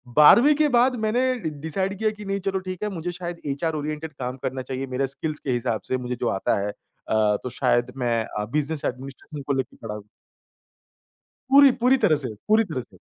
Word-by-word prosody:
12वीं 235 Hz, -, +8 dB
के 300 Hz, 0 st, +3 dB
बाद 250 Hz, +1 st, +3 dB
मैंने 225 Hz, +4 st, +1 dB, 0.2 s
ड 160 Hz, -, -3 dB
डिसाइड 190 Hz, +5 st, -2 dB
किया 220 Hz, -1 st, +2 dB
कि 210 Hz, -1 st, -10 dB
नहीं 195 Hz, 0 st, -1 dB
चलो 190 Hz, -1 st, +1 dB
ठीक 185 Hz, +1 st, -6 dB
है 210 Hz, -, 0 dB
मुझे 170 Hz, +2 st, -3 dB
शायद 175 Hz, -1 st, -6 dB
एचआर 150 Hz, +3 st, -1 dB
ओरिएंटेड 155 Hz, +1 st, -4 dB
काम 130 Hz, -1 st, -5 dB
करना 130 Hz, -, -2 dB
चाहिए 130 Hz, +1 st, -4 dB
मेरे 135 Hz, +1 st, +1 dB
स्किल्स 150 Hz, +3 st, -4 dB
के 135 Hz, -, -3 dB
हिसाब 120 Hz, -2 st, -1 dB
से 130 Hz, -, +1 dB
मुझे 125 Hz, 0 st, -4 dB
जो 120 Hz, -, +1 dB
आता 95 Hz, -, 0 dB
है। 100 Hz, -, -2 dB
अ, 105 Hz, 0 st, -1 dB
तो 125 Hz, -, -3 dB
शायद 125 Hz, -1 st, +1 dB
मैं 120 Hz, -3 st, +1 dB
अ, 105 Hz, 0 st, -4 dB
बिज़नेस 150 Hz, 0 st, -1 dB
एडमिनिस्ट्रेशन 135 Hz, +3 st, -6 dB
को 140 Hz, -, +1 dB
लेके 130 Hz, -1 st, -3 dB
खड़ा 105 Hz, -2 st, -6 dB, 1.5 s
पूरी 280 Hz, 0 st, +8 dB
पूरी 255 Hz, +2 st, +5 dB
तरह 205 Hz, -11 st, +3 dB
से, 130 Hz, -6 st, -4 dB
पूरी 220 Hz, +1 st, +5 dB
तरह 155 Hz, -, -4 dB
से। -, -, -18 dB
150 Hz, 205 wpm, -24 LUFS, 125-195 Hz, 1.5 s, 12वीं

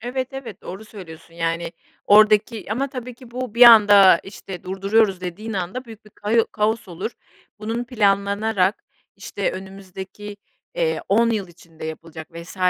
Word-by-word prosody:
Evet, 255 Hz, +2 st, -3 dB
evet, 245 Hz, -7 st, -8 dB
doğru 190 Hz, +4 st, -8 dB
söylüyorsun, 170 Hz, -6 st, -12 dB
yani, 165 Hz, 0 st, -2 dB, 0.3 s
oradaki 215 Hz, +1 st, +4 dB
ama 275 Hz, +5 st, -1 dB
tabii 250 Hz, -2 st, -7 dB
ki 245 Hz, 0 st, -16 dB
bu 250 Hz, -2 st, -5 dB
bir 240 Hz, -, +4 dB
anda, 205 Hz, -6 st, +8 dB
işte, 195 Hz, -2 st, -10 dB
durduruyoruz 195 Hz, +1 st, +1 dB
dediğin 185 Hz, +5 st, -6 dB
anda 195 Hz, +6 st, -4 dB
büyük 225 Hz, -3 st, -13 dB
bir 210 Hz, -, -18 dB
kao 220 Hz, +3 st, 0 dB
kaos 220 Hz, 0 st, -1 dB
olur, 185 Hz, +6 st, -5 dB, 0.5 s
bunun 225 Hz, +3 st, -3 dB
planlanarak, 200 Hz, -3 st, 0 dB, 0.3 s
işte, 200 Hz, -, -3 dB
önümüzdeki, 195 Hz, +2 st, -9 dB, 0.4 s
ııı, -, -, 0 dB
10 230 Hz, +3 st, +3 dB
yıl 205 Hz, -5 st, -2 dB
içinde 165 Hz, -2 st, -14 dB
yapılacak 160 Hz, 0 st, -8 dB
vs. 170 Hz, +3 st, -11 dB
205 Hz, 145 wpm, -21 LUFS, 185-225 Hz, 0.5 s, anda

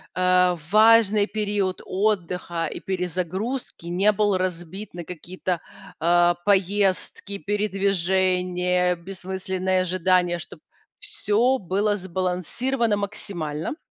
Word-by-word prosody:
э, 180 Hz, 0 st, +3 dB
важный 215 Hz, 0 st, +5 dB
период 205 Hz, -3 st, -1 dB
отдыха 180 Hz, -4 st, -1 dB
и -, -, -7 dB
перезагрузки 185 Hz, +5 st, -3 dB
не 185 Hz, +5 st, +3 dB
был 205 Hz, -1 st, +1 dB
разбит 185 Hz, +2 st, -4 dB
на 175 Hz, -1 st, -7 dB
какие-то, 180 Hz, 0 st, -4 dB, 0.4 s
э, 175 Hz, +1 st, +4 dB
поездки, 200 Hz, 0 st, +1 dB
передвижения, 185 Hz, -2 st, +1 dB
бессмысленные 185 Hz, +1 st, -2 dB
ожидания. 180 Hz, -1 st, +1 dB
Чтоб -, -, -10 dB, 0.4 s
всё 260 Hz, -, +1 dB
было 205 Hz, 0 st, 0 dB
сбалансировано 190 Hz, -, -1 dB
максимально. 190 Hz, -, -4 dB
185 Hz, 90 wpm, -24 LUFS, 180-205 Hz, 0.4 s, важный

